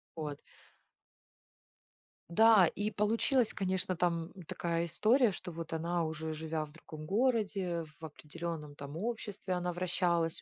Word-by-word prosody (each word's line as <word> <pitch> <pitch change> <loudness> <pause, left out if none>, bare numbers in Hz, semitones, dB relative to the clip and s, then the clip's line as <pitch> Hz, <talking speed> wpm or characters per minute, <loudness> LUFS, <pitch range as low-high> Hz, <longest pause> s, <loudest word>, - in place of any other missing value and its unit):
Вот. 150 -3 -4 1.9
Да, 220 +1 +7
и 205 +5 -1
получилась, 225 +3 +2
конечно, 190 -1 0
там 170 -1 0 0.2
такая 170 0 -1
история, 220 - +4
что 180 - -6
вот 165 0 -6
она, 170 +1 0
уже 160 0 -3
живя 155 0 -3
в 150 - -16
другом 155 -1 -10
городе, 200 -4 +1 0.2
в - - -18
определенном 155 0 -6
там 145 +1 -7
обществе 205 -2 -3
она 180 0 -1
вращалась, 175 -2 +1
175 Hz, 125 wpm, -33 LUFS, 160-200 Hz, 1.9 s, Да